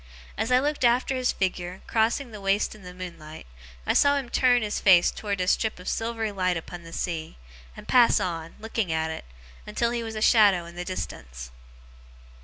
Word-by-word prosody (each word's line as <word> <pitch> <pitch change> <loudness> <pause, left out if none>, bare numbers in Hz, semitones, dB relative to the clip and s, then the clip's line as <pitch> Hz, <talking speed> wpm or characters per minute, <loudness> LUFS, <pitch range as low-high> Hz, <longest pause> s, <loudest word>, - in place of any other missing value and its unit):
As 225 - -2
I 250 - +6
looked 290 +1 -1
after 245 +2 +3
his 255 -1 +1
figure, 185 -1 -3
crossing 230 +3 0
the 210 -2 -9
waste 195 +1 +1
in 215 - -14
the 180 -1 -9
moonlight, 170 -4 -9 0.4
I - - +2
saw 285 0 +4
him 265 -3 -4
turn 245 -2 +3
his 210 -1 -2
face 180 -3 +5
towards 200 -2 -4
a - - -4
strip 220 +3 +1
of 180 - -11
silvery 225 -1 -2
light 185 -3 0
upon 175 +2 -8
the 165 -1 -12
sea, 165 - -4 0.4
and - - -11
pass 245 -2 +5
on, 165 -2 -4
looking 220 -4 -2
at 160 0 -1
it, 160 - -7 0.4
until 235 +3 0
he 240 -1 -2
was 225 -1 -6
a - - -3
shadow 200 -7 +5
in 170 - -11
the 175 - -4
distance. 60 - -6
200 Hz, 200 wpm, -26 LUFS, 175-230 Hz, 0.4 s, I